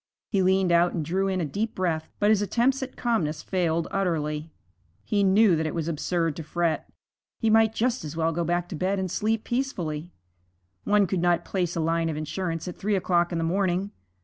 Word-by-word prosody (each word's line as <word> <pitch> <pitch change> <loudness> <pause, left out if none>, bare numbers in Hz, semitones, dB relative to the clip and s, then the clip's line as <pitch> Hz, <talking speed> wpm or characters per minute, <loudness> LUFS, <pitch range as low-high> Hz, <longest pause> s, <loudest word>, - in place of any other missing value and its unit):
He 195 - +2
leaned 190 -1 +3
out 170 +1 +4
and 160 -3 -2
drew 190 +5 0
in 190 -1 0
a 170 - 0
deep 210 +9 -3
breath, 165 -4 -1
but 205 +1 +3
his 210 -2 +3
attempts 240 +7 +1
at 265 -1 -5
calmness 165 -11 -1
failed 170 -3 0
utterly. 160 -5 -1 0.5
He 205 - +1
knew 195 -1 +5
that 160 0 -1
it 155 - -4
was 165 -2 -2
absurd 165 0 -1
to 165 - -5
fret; 165 +1 -1 0.5
he 225 -2 +1
might 220 0 +4
just 250 +2 0
as 155 +1 -6
well 165 0 +1
go 170 +1 -1
back 175 +1 0
to 180 - -5
bed 185 +5 0
and 190 -2 -2
sleep 220 +1 0
peacefully. 175 - -2 0.8
One 205 -1 +4
could 185 -1 -1
not 175 -1 +2
place 180 -3 -1
a - - -1
line 165 +1 +1
of 155 - -3
insurance 165 +2 -3
at 180 - -6
three 205 +1 0
o'clock 175 -2 +1
in 170 - -1
the 165 - 0
morning. 185 +2 0
175 Hz, 210 wpm, -26 LUFS, 165-200 Hz, 0.8 s, knew